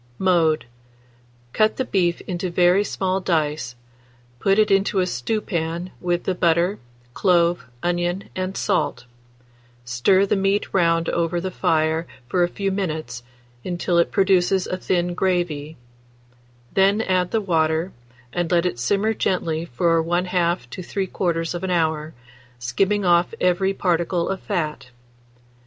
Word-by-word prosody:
Mode. 170 -6 +2 0.9
Cut 215 0 +2
the 260 - -1
beef 175 -6 0
into 180 0 -4
very 180 +3 +4
small 190 -2 -1
dice; 150 -8 -1 0.6
put 195 +9 +2
it 215 -1 +3
into 195 0 +2
a 185 - +2
stewpan 170 - -3
with 175 -1 0
the 190 - 0
butter, 175 +2 +1 0.3
clove, 175 -1 +2 0.2
onion, 175 +2 -1
and 185 +1 -3
salt; 150 -10 -1 0.8
stir 125 +12 +3
the 200 - +1
meat 195 +1 0
round 165 -2 +2
over 170 0 0
the 185 +2 -4
fire 160 0 +1 0.2
for 180 +8 0
a 175 - +4
few 195 +2 -2
minutes, 155 -11 -3 0.4
until 175 -1 0
it 170 - +3
produces 190 -1 +3
a - - -3
thin 175 -1 0
gravy; 175 -5 -1 1.0
then 195 +2 +3
add 185 -4 +1
the 225 - +1
water, 165 -2 0 0.4
and 175 -2 -1
let 175 0 +3
it 175 -10 -2
simmer 200 - +1
gently 165 -5 -1
from 165 +4 +1
1/2 175 -4 0
to 185 - -6
3/4 175 -1 -2
hour, 160 -3 0 0.4
skimming 190 +13 0
off 175 0 +3
every 180 +2 +2
particle 175 -2 0
of 195 -1 -3
fat. 155 - -3
175 Hz, 135 wpm, -22 LUFS, 165-190 Hz, 1.0 s, very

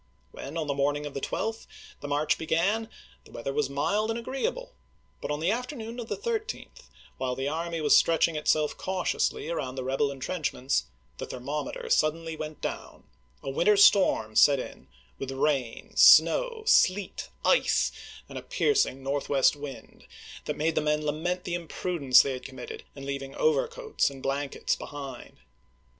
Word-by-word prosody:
When, 145 +5 -7
on 160 - -1
the 145 - -1
morning 145 +1 0
of 145 - -6
the 140 - -4
12th, 225 +9 -3 0.3
the 145 - -7
march 145 +1 +1
began, 195 +8 0 0.3
the - - -18
weather 125 +4 -5
was 150 0 0
mild 200 +10 0
and 225 - -1
agreeable; 475 - -3 0.5
but - - -5
on 150 0 -2
the 170 +5 +1
afternoon 240 -1 -4
of 235 - -6
the - - -2
13th, 460 -1 -5 0.3
while 130 -1 -1
the 135 +1 -2
army 165 +2 -3
was 150 - +5
stretching 165 0 +3
itself 150 0 +1
cautiously 185 -4 -1
around 135 -6 -3
the 130 - -4
rebel 135 +2 0
intrenchments, 135 - -2 0.3
the - - -5
thermometer 150 - -5
suddenly 165 - +1
went 155 0 -7
down, - - -6 0.4
a 135 - -3
winter 205 +9 +3
storm 185 - +5
set 140 +4 +6
in 65 - -8 0.3
with 135 - -4
rain, 135 -3 -1
snow, 475 -3 +6
sleet, 200 - +2 0.2
ice, - - +3 0.4
and - - -7
a - - -10
piercing 425 - +1
northwest 140 0 +2
wind, 145 -3 -10 0.4
that - - -3
made 160 +2 +1
the - - +1
men 150 0 0
lament 175 +5 -2
the 175 - -4
imprudence 170 -5 +3
they 140 - -2
had 130 - -7
committed 130 -2 -8
in 135 -1 -8
leaving 140 -1 -5
overcoats 470 - +1
and 135 -1 -11
blankets 140 +1 -1
behind. 140 -4 -9
150 Hz, 160 wpm, -27 LUFS, 140-205 Hz, 0.5 s, set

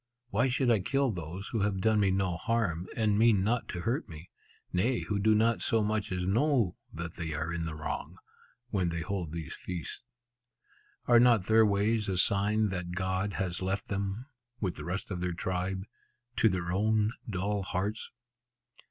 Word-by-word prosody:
Why 115 +6 +3
should 125 -1 +2
I 110 - +4
kill 135 +7 +1
those 90 +2 -6
who 115 - -1
have 100 -1 0
done 110 +2 +3
me 100 -2 +3
no 95 -2 +1
harm, 90 -3 -1
and 105 -2 +2
mean 110 -4 +5
not 115 +3 0
to 85 - -4
hurt 125 - -1
me? 80 +3 -11 0.4
Nay, 115 +8 +1
who 105 -1 -2
do 110 +2 +4
not 110 -3 +2
so 110 +2 +2
much 105 -1 -1
as 90 -1 -1
know 115 - +2 0.2
that 85 0 -6
they 80 -3 -3
are 80 +2 -2
in 85 -1 -2
the 80 - -5
wrong, 75 0 -5 0.5
when 95 -4 +1
they 85 0 -3
hold 90 -3 -3
these 80 -3 -5
feasts. 90 +5 -6 1.0
Are 120 -1 +6
not 120 -5 +5
their 110 +2 +5
ways 105 +1 +1
a 95 - 0
sign 105 +3 +3
that 90 -2 -4
God 95 +2 -1
has 90 -2 -2
left 95 +1 -2
them 100 +4 -2 0.3
(with 95 -5 -1
the - - -7
rest 95 +4 -4
of 90 -2 -3
their 90 -1 -1
tribe) 95 +2 -2 0.5
to 115 - +5
their 90 -2 -2
own 105 +3 +2 0.2
dull 100 +1 -1
hearts? 95 +3 -3
100 Hz, 185 wpm, -30 LUFS, 90-110 Hz, 1.0 s, Are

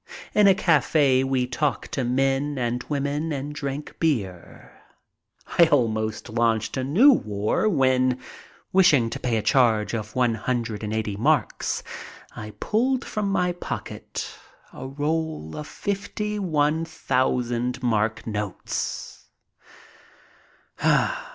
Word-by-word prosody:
In 210 -1 +5
a 195 - +6
cafe 145 -7 +3
we 135 -1 +1
talked 130 +3 -2
to 135 - -1
men 135 +3 0
and 120 0 -1
women 145 +2 -1
and 145 0 -4
drank 140 0 -5
beer. 105 - -2 0.9
I 170 - +10
almost 110 -6 0
launched 115 -1 0
a 130 - -1
new 195 - +6
war 105 - 0
when, 130 -6 +2 0.6
wishing 150 -12 +5
to - - -4
pay 120 -3 0
a 110 - -2
charge 115 -5 +3
of 110 -1 -4
one 125 -2 +2
hundred 115 -1 -2
and 105 - -3
eighty 110 -2 -2
marks, 145 +5 0 0.5
I 105 0 -7
pulled 255 +4 0
from 210 -2 -2
my 180 -2 +1
pocket 175 - -6 0.5
a - - -7
roll 150 - -3
of 150 - -6
fifty 205 +4 -3
one 155 -3 +1
thousand 125 -5 -1
mark 115 -1 0
notes. 105 -3 -4
130 Hz, 120 wpm, -24 LUFS, 115-155 Hz, 0.9 s, I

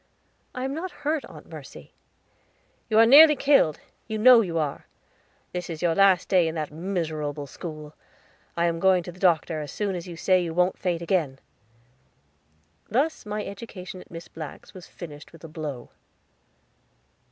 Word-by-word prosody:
"I 255 - -4
am 270 +1 -2
not 340 +5 -4 0.2
hurt, 305 -1 0
Aunt - - -13
Mercy." - - -12 1.0
"You 220 - +2
are 225 - +8
nearly 300 +5 +9
killed, 275 - +3 0.3
you 220 0 -3
know 240 +2 +7
you 170 -6 -3
are. 150 -3 -3 0.7
This 180 -1 -4
is 165 0 -6
your 170 -1 +3
last 195 0 +4
day 180 -3 +3
at 160 - -3
that 155 -2 -3
miserable 155 -4 -3
school. 155 0 -9 0.6
I 170 - +2
am 165 -1 0
going 185 -1 +3
for 175 - -7
the 180 - -17
doctor, 165 -3 +2
as 145 -2 -7
soon 205 -2 -2
as 180 0 -6
you 170 -2 -8
say 185 +2 +2
you 165 -1 -5
wont 180 +1 +1
faint 175 -2 -1
again." 165 -7 0 1.5
Thus 270 +2 0
my 210 0 -3
education 195 -3 -8
at - - -17
Miss 165 0 -9
Black's 155 -3 -10
was 185 -2 -11
finished 150 -4 -11
with 165 - -16
a - - -7
blow. 150 -6 -7
175 Hz, 170 wpm, -25 LUFS, 160-205 Hz, 1.5 s, nearly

